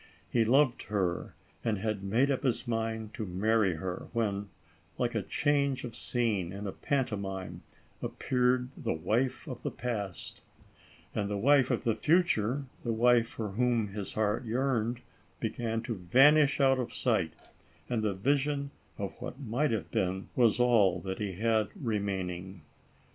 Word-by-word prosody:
He 115 Hz, -, +4 dB
loved 130 Hz, +2 st, +3 dB
her 95 Hz, -4 st, -1 dB, 0.3 s
and 110 Hz, -3 st, 0 dB
had 105 Hz, 0 st, -2 dB
made 120 Hz, +8 st, +2 dB
up 135 Hz, -, 0 dB
his 130 Hz, -2 st, 0 dB
mind 110 Hz, -1 st, -2 dB
to 115 Hz, -, -4 dB
marry 100 Hz, 0 st, +1 dB
her, 90 Hz, +3 st, -5 dB
when, 105 Hz, -3 st, -1 dB, 0.5 s
like -, -, 0 dB
a -, -, 0 dB
change 140 Hz, -2 st, +1 dB
of 120 Hz, -3 st, -6 dB
scene 110 Hz, -8 st, 0 dB
in 100 Hz, +2 st, -6 dB
a 100 Hz, -, -2 dB
pantomime, 100 Hz, -10 st, -2 dB, 0.4 s
appeared 125 Hz, 0 st, +1 dB
the -, -, -2 dB
wife 115 Hz, +11 st, 0 dB
of -, -, -6 dB
the -, -, -2 dB
past; 105 Hz, -7 st, -4 dB, 0.7 s
and 100 Hz, -1 st, -1 dB
the 105 Hz, -, -1 dB
wife 135 Hz, +4 st, +4 dB
of 125 Hz, -, 0 dB
the 115 Hz, -, +2 dB
future, 140 Hz, -, +2 dB, 0.2 s
the 120 Hz, -, -1 dB
wife 120 Hz, 0 st, +4 dB
for 110 Hz, -2 st, -5 dB
whom 115 Hz, 0 st, +1 dB
his 100 Hz, 0 st, -2 dB
heart 110 Hz, +2 st, 0 dB
yearned, 120 Hz, 0 st, 0 dB, 0.4 s
began 115 Hz, 0 st, -2 dB
to 120 Hz, -, -3 dB
vanish 135 Hz, -, +5 dB
out 135 Hz, -1 st, +4 dB
of 125 Hz, -, -3 dB
sight, 95 Hz, -11 st, 0 dB, 0.5 s
and 120 Hz, -3 st, 0 dB
the 105 Hz, -3 st, 0 dB
vision 140 Hz, +5 st, 0 dB, 0.3 s
of 100 Hz, +3 st, -5 dB
what 125 Hz, +1 st, -6 dB
might 135 Hz, +3 st, 0 dB
have 110 Hz, -4 st, -2 dB
been 95 Hz, +1 st, -1 dB
was 120 Hz, -2 st, +4 dB
all 105 Hz, -7 st, +4 dB
that 95 Hz, 0 st, -4 dB
he 100 Hz, -3 st, -2 dB
had 110 Hz, +2 st, +1 dB
re 115 Hz, -6 st, -1 dB
maining. 95 Hz, -2 st, -4 dB
115 Hz, 160 wpm, -30 LUFS, 100-125 Hz, 0.7 s, vanish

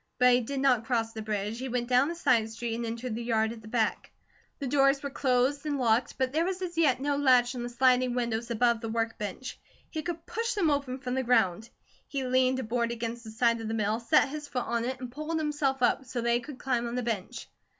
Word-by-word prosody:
But 250 Hz, 0 st, +6 dB
he 245 Hz, -, +4 dB
did 275 Hz, +4 st, -4 dB
not 255 Hz, -5 st, +3 dB
cross 225 Hz, -2 st, 0 dB
the 220 Hz, -, -5 dB
bridge, 210 Hz, +1 st, -3 dB
he 260 Hz, +1 st, -4 dB
went 240 Hz, 0 st, -1 dB
down 255 Hz, +2 st, +4 dB
the 340 Hz, -, -4 dB
side 230 Hz, -9 st, +2 dB
street, 230 Hz, +1 st, -4 dB
and 235 Hz, 0 st, -3 dB
entered 230 Hz, +1 st, -4 dB
the 230 Hz, -, -4 dB
yard 220 Hz, -2 st, +1 dB
at 230 Hz, -1 st, -9 dB
the 215 Hz, -, -13 dB
back. 220 Hz, -1 st, -1 dB, 0.5 s
The 280 Hz, -, -5 dB
doors 275 Hz, +1 st, +3 dB
were 280 Hz, -, -4 dB
closed 265 Hz, +2 st, +1 dB
and 295 Hz, -2 st, -1 dB
locked, 235 Hz, -1 st, +1 dB
but 260 Hz, 0 st, 0 dB
there 320 Hz, +2 st, +2 dB
was 370 Hz, +1 st, -2 dB
as 345 Hz, -1 st, -4 dB
yet 300 Hz, -7 st, +3 dB
no 285 Hz, +1 st, 0 dB
latch 255 Hz, -3 st, +4 dB
on 250 Hz, -, -5 dB
the 240 Hz, -, -4 dB
sliding 250 Hz, 0 st, +3 dB
windows 235 Hz, -1 st, -2 dB
above 235 Hz, 0 st, +2 dB
the 225 Hz, -, -4 dB
work 225 Hz, 0 st, -2 dB
bench. 210 Hz, +5 st, -5 dB, 0.3 s
He 315 Hz, -, -3 dB
could 335 Hz, +1 st, -5 dB
push 460 Hz, +1 st, -2 dB
them 345 Hz, -7 st, +2 dB
open 275 Hz, -3 st, -1 dB
from 255 Hz, -2 st, -4 dB
the 265 Hz, -, +1 dB
ground. 225 Hz, -4 st, +2 dB, 0.4 s
He 275 Hz, -2 st, -3 dB
leaned 255 Hz, 0 st, +2 dB
a 260 Hz, -, -2 dB
board 235 Hz, +1 st, -1 dB
against 235 Hz, 0 st, -4 dB
the 220 Hz, -, -9 dB
side 230 Hz, +1 st, +1 dB
of 225 Hz, -, -5 dB
the 225 Hz, -, -2 dB
mill, 215 Hz, +1 st, 0 dB
set 235 Hz, +4 st, +3 dB
his 300 Hz, +1 st, -6 dB
foot 250 Hz, -3 st, -3 dB
on 235 Hz, 0 st, -1 dB
it, 260 Hz, +1 st, -3 dB
and 250 Hz, -1 st, -7 dB
pulled 305 Hz, +4 st, -3 dB
himself 290 Hz, -4 st, 0 dB
up, 245 Hz, -, +3 dB
so 250 Hz, -1 st, -4 dB
that 235 Hz, 0 st, +1 dB
he 240 Hz, -, +3 dB
could 265 Hz, +2 st, -9 dB
climb 245 Hz, -3 st, -1 dB
on 235 Hz, -, -4 dB
the 250 Hz, -, -1 dB
bench. 220 Hz, -5 st, -4 dB
245 Hz, 255 wpm, -29 LUFS, 230-270 Hz, 0.5 s, But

